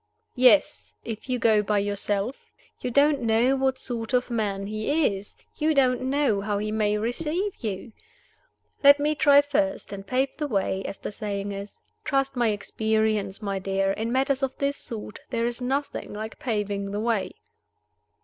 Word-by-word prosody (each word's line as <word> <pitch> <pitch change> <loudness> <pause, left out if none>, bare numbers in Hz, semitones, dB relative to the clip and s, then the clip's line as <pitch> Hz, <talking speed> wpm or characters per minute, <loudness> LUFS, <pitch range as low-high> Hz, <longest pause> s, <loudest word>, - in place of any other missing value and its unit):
"Yes 255 +3 +3
if 225 +2 -6
you 250 - +1
go 220 -3 +4
by 210 0 0
yourself. 205 +3 -1 0.4
You - - -3
don't 280 +2 +3
know 235 +3 +3
what 265 -1 +1
sort 235 -1 -4
of 250 0 0
man 205 -4 -1
he 215 +4 +1
is; 195 +1 -9 0.2
you 310 +1 +1
don't 255 -2 +3
know 260 -5 +1
how 205 0 -1
he 215 +1 -2
may 210 -1 +1
receive 320 - -2
you. 215 0 -5 0.9
Let 285 +1 +8
me 300 +1 +2
try 285 -2 +6
first, 290 -5 -1
and 195 0 -8
pave 265 +4 0
the 300 - -2
way, 195 -5 0
as 195 - -5
the - - -6
saying 205 -1 -4
is. 200 +1 -8 0.2
Trust 275 -2 0
my 240 -2 +2
experience, 215 -1 0
my 195 -1 -2
dear. 195 0 0
In 225 +3 -2
matters 270 +1 +1
of 265 -1 -2
this 280 0 0
sort 215 -4 -7
there 230 -1 0
is 240 +1 -2
nothing 270 0 -2
like 215 +1 -6
paving 205 -4 -2
the 205 +1 -3
way." 220 -3 -1
230 Hz, 170 wpm, -26 LUFS, 205-270 Hz, 0.9 s, Let